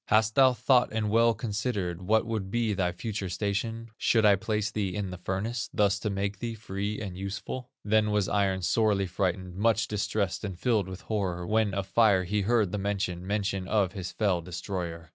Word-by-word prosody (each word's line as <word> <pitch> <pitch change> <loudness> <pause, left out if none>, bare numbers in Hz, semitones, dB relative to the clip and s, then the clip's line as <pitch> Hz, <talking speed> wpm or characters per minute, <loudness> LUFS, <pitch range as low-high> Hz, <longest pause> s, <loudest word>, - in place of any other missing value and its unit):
Hast 110 -1 +3
thou 130 0 +6
thought 125 +1 +3
and 110 -1 -1
well 115 +1 +4
considered, 105 -6 -2
What 110 +5 +2
would 110 -4 -3
be 115 0 0
thy 90 -2 0
future 100 +1 -4
station, 110 +5 -2
Should 110 -2 +3
I 100 -1 +7
place 105 +2 -1
thee 100 -4 -2
in 100 -3 -3
the 90 - -7
furnace, 105 +6 -3
Thus 100 -2 +2
to 105 - -2
make 100 0 -2
thee 115 0 -3
free 105 0 -4
and 100 -4 -5
useful?' 100 +6 -5 0.2
"Then 105 0 +3
was 105 -2 +1
Iron 95 -2 +1
sorely 105 0 +2
frightened, 90 0 -2
Much 110 +1 +2
distressed 100 -1 -1
and 95 -4 -4
filled 105 -1 +1
with 95 0 -7
horror, 95 -5 -2
When 105 0 +1
of 100 -1 -1
Fire 100 -2 +4
he 100 +3 0
heard 105 -2 +2
the 105 - -2
mention, 95 -3 -2
Mention 100 -2 -1
of 100 -3 +2
his 95 -2 -5
fell 100 -5 +1
destroyer. 85 -2 -5
100 Hz, 195 wpm, -28 LUFS, 95-110 Hz, 0.2 s, I